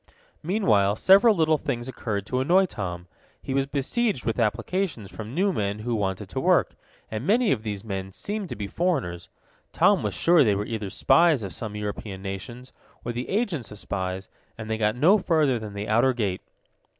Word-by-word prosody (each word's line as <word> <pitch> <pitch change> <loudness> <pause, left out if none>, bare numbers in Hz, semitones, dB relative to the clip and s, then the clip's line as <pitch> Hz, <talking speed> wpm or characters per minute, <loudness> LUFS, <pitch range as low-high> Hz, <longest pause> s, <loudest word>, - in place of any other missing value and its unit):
Meanwhile 110 - +2
several 200 - +6
little 160 -3 +2
things 120 -3 -3
occurred 105 -6 -4
to 125 +4 -1
annoy 180 +8 +4
Tom. 90 - -5 0.3
He 135 - -5
was 135 0 +1
besieged 145 - -1
with 115 +1 -1
applications 115 - -1
from 110 +3 -8
new 195 +2 +2
men 100 -4 -1
who 120 +3 -3
wanted 95 -4 -2
to - - -3
work, - - +3 0.4
and 110 +1 -3
many 225 - +3
of 120 - +1
these 105 -3 -5
men 95 -3 -5
seemed 205 - -4
to - - -5
be 105 - -4
foreigners. 130 - -2 0.4
Tom - - +4
was - - -2
sure 170 -3 +5
they 105 -5 +2
were 100 +1 -2
either 110 -3 -4
spies 165 - +3
of 95 - -5
some 105 -2 -5
European 105 -1 -5
nations, 115 +6 -7 0.3
or 120 - -2
the 120 +1 -5
agents 190 - -1
of 105 - -10
spies, 95 -1 -4 0.3
and 110 0 -6
they 110 - 0
got 105 0 +1
no 175 +12 +5
further 155 -9 +2
than 105 -2 -8
the 100 +1 -4
outer 120 +5 +3
gate. 100 -6 -2
115 Hz, 190 wpm, -25 LUFS, 100-160 Hz, 0.4 s, several